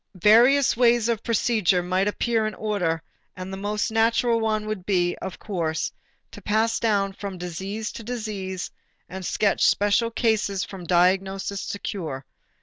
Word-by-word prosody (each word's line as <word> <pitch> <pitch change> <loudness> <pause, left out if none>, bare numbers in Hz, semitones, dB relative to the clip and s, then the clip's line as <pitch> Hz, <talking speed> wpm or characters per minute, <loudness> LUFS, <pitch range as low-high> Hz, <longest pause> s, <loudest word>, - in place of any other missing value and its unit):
Various 245 +6 +6
ways 235 -1 +3
of 230 -2 0
procedure 215 -6 +1
might 185 +2 0
appear 220 +1 0
in 215 - -5
order 180 -7 -1 0.3
and 185 +1 -6
the - - -4
most 205 +2 -2
natural 230 +1 +2
one 215 -1 0
would 215 -4 -4
be, 175 -2 +1
of 190 - -6
course, 165 -6 -2 0.4
to - - -11
pass 220 +2 +1
down 200 -3 +1
from 195 -1 -6
disease 190 +5 -5
to 230 - -9
disease 210 -5 -5 0.4
and 190 0 -7
sketch 200 +2 +1
special 205 +3 +2
cases 215 -4 0
from 190 -3 -8
diagnosis 190 +2 +1
to - - -4
cure. 155 -10 -5
205 Hz, 150 wpm, -24 LUFS, 185-225 Hz, 0.4 s, Various